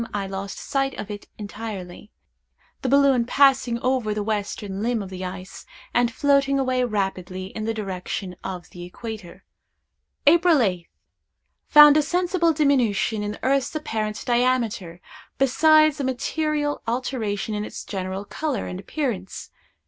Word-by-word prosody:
I 200 -1 -1
lost 195 +1 -5
sight 270 -1 -1
of 210 - -6
it 205 0 -8
entirely; 205 -3 -7 0.7
the 260 - -1
balloon 275 -2 +4
passing 265 -1 +3
over 250 -5 0
the 210 - -2
western 205 -2 -3
limb 230 -1 0
of 190 - -10
the 185 0 -6
ice, 185 +1 -7 0.3
and 240 -1 +2
floating 275 +1 +2
away 255 -1 +1
rapidly 190 -4 -3
in 215 - -3
the 225 - -1
direction 190 -2 -4
of 185 -2 -6
the 175 - -9
equator. 190 -1 -8 0.8
"April 335 +2 +6
8th. 180 -9 0 0.8
Found 295 0 +9
a - - +5
sensible 350 +2 +1
diminution 255 -8 +1
in 210 0 -3
the - - -9
earth's 275 +2 +1
apparent 220 -8 -3
diameter, 235 -8 0 0.4
besides 310 +3 +4
a - - -1
material 290 +3 -1
alteration 230 -4 -2
in 210 0 -2
its - - -7
general 190 0 -4
color 290 -1 -3
and 180 - -6
appearance. 200 -4 -4
225 Hz, 140 wpm, -23 LUFS, 195-275 Hz, 0.8 s, Found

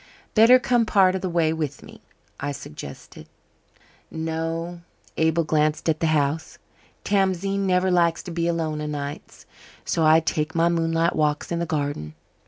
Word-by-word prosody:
"Better 230 +3 +7
come 240 -2 +1
part 190 -3 +4
of 190 - -3
the 185 - -2
way 165 -2 +1
with 150 -3 -4
me," - - -14 0.4
I 145 +1 -3
suggested. 75 - -10 0.8
"No." 165 +2 -4 0.3
Abel 160 +1 +2
glanced 155 0 0
at 160 -1 +1
the 165 - +1
house. 155 0 0 0.5
"Tamzine 195 0 0
never 185 0 +2
likes 170 -2 +2
to 180 - -7
be 170 0 -1
alone 160 -3 -1
o' 150 - -3
nights. 145 -1 -6 0.4
So 165 - 0
I 155 +1 +6
take 155 0 -2
my 165 +1 +3
moonlight 165 0 +1
walks 150 0 0
in 170 - -1
the 170 - -2
garden. 145 - -3
165 Hz, 160 wpm, -24 LUFS, 155-175 Hz, 0.8 s, Better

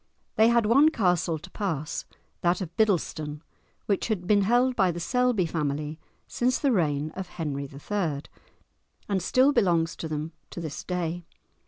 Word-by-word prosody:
They 220 +1 +6
had 235 -1 +4
one 275 +8 +6
castle 180 - +1
to 155 - -12
pass, 160 -7 -3 0.4
that 175 +1 +2
of 175 -3 -6
Biddleston, 155 -8 0 0.4
which 200 - 0
had 205 -6 -2
been 205 +2 +4
held 245 +5 +3
by 190 -5 +3
the 175 0 -3
Selby 250 0 +1
family 150 -1 -2 0.3
since 250 +1 0
the 280 - +1
reign 155 - +1
of 190 +1 -6
Henry 145 -6 -4
III., 150 0 -2 0.8
and 195 -2 0
still 260 +9 +4
belongs 170 - +2
to 160 - -4
them 155 +1 -4 0.2
to - - -7
this 160 -4 -5
day. 175 -1 -3
175 Hz, 160 wpm, -27 LUFS, 155-215 Hz, 0.8 s, They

